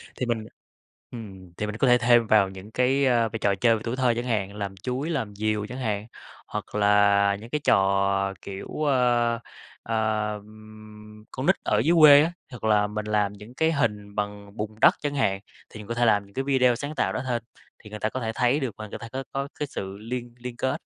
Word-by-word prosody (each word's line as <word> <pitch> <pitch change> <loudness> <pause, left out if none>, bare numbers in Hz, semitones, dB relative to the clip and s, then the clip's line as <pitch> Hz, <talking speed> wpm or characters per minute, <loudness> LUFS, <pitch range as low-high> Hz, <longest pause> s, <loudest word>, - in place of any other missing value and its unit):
Thì 125 - -2
mình 115 -2 -2 0.7
ừm, 95 -7 -10
thì 105 - -2
mình 105 0 -5
có 135 - +2
thể 125 0 +6
thêm 120 -1 +4
vào 105 -3 +4
những 95 +2 -11
cái, 130 +3 +2
ơ, 120 -3 +3
v 115 - -9
trò 100 -1 +2
chơi 115 +3 +3
về 110 - -5
tuổi 115 +1 -2
thơ 130 -2 +2
chẳng 120 +1 -3
hạn, 105 -5 -1
làm 100 -2 -5
chuối, 125 - -3
làm 115 -11 -3
diều 105 0 -1
chẳng 125 +4 -7
hạn, 105 -4 -2 0.4
hoặc - - -6
là 100 -1 +4
những 115 +2 -11
cái 150 +4 -2
trò, 100 0 +2
kiểu, 95 0 -7 0.2
ơ, 120 -4 +2 0.4
ờm, 110 -1 -4
con - - -4
nít - - +5
ở - - +2
dưới 170 +3 +3
quê 145 -2 +9
á, 165 - -1 0.2
hoặc 125 - -10
là 105 -1 +3
mình 105 0 -4
làm 105 -1 0
những 105 +4 -13
cái 160 +3 +2
hình 105 -9 -1
bằng 105 0 -5
bùn 105 0 -4
đất - - +7
chẳng 145 -1 -2
hạn. 95 -8 +1 0.3
Thì 105 - -11
mình 105 - -10
có 115 - -2
thể 120 +1 +1
làm 105 -3 +3
những 100 - -21
cái 135 - -2
video 130 -3 +3
sáng 145 +5 -5
tạo - - 0
đó - - -2
thêm, 120 -2 -1 0.4
thì 105 - -11
người 105 0 -7
ta 110 - 0
có 130 - -4
thể 110 -3 -2
thấy 125 +4 +2
được 130 -8 -3
và 110 - -7
người - - -8
ta 115 - -8
có 130 +3 -5
có 135 +1 -3
cái 150 - -2
sự 95 -6 -6
liên 120 +2 -6
liên 125 0 -7
kết, 130 - -1
110 Hz, 230 wpm, -25 LUFS, 105-125 Hz, 0.7 s, quê